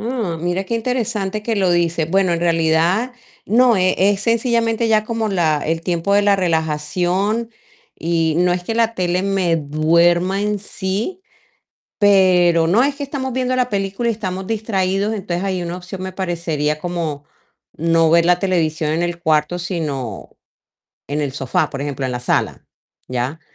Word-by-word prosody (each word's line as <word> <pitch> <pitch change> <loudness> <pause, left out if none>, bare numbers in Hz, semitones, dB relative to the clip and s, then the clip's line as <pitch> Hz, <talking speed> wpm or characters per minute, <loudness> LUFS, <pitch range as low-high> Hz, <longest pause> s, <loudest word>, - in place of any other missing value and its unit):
Mm, 215 -8 -3
mira 175 +2 0
qué 230 +4 -2
interesante 220 -4 -2
que 225 -1 -1
lo 185 -3 +2
dices, 170 -2 0
bueno, 190 -1 +2
en 170 - 0
realidad 170 +7 +1 0.3
no, 235 +1 +4
eh, 185 0 +2
es 200 +1 +3
sencillamente 230 0 +1
ya 215 -1 +3
como 225 -1 -2
la 165 -6 +1
el 165 +1 0
tiempo 175 +3 0
de 205 - +4
la 200 -1 +4
relajación 180 +6 0 0.5
y, 165 -1 0
no 180 0 +3
es 180 0 -2
que 225 +5 -3
la 230 0 +2
tele 180 -1 0
me 185 -4 +1
duerma 170 +5 +2
en 210 -1 -1
sí, 205 - -4 0.8
pero, 180 -4 +4
no 210 +10 +3
es 280 0 0
que 285 - -5
estamos 265 -2 -4
viendo 255 0 -1
la 250 -1 +1
película 200 +3 -1
y, - - +3
estamos 190 -3 -4
distraídos, 205 -2 -1
entonces, 190 -3 -3
ahí 185 -2 -1
una 175 +1 -4
opción 185 +1 -8
me 190 0 -4
parecería 165 -5 -2
como 165 -5 -4 0.5
no 165 0 +3
ver 170 0 +4
la 180 0 +3
televisión 160 -5 0
en 165 +2 0
el 175 0 -3
cuarto, 155 +2 +1
sino 145 - -4 0.8
en 150 +1 -2
el 140 -3 -2
sofá, 135 -2 -1
por 135 - -6
ejemplo, 140 -2 -3
en 125 - -3
la 125 - -3
sala, 125 - -1 0.4
¿ya?, 130 +6 -3
180 Hz, 170 wpm, -19 LUFS, 165-210 Hz, 0.8 s, no